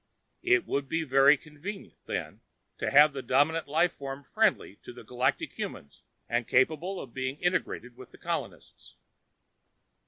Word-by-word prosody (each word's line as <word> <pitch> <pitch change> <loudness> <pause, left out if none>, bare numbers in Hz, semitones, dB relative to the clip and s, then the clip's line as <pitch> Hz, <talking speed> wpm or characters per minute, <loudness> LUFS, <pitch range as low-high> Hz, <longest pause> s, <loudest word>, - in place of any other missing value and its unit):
It 365 0 +3
would 140 -1 -2
be 165 0 0
very 135 +1 +5
convenient 150 +9 -9
then - - -4 0.4
to - - -1
have 145 +1 +6
a 135 - -3
dominant 145 +6 +1
life 160 +4 +2
form 135 0 -7
friendly 205 - 0
to - - -11
the 120 -1 -12
galactic 125 +3 -1
humans 70 - -7 0.3
and 120 -1 -1
capable 160 +9 +1
of 120 - -9
being 130 +1 -3
integrated 175 -9 -2
with 130 0 -13
the - - -17
colonists. - - -6
140 Hz, 150 wpm, -28 LUFS, 130-165 Hz, 0.4 s, have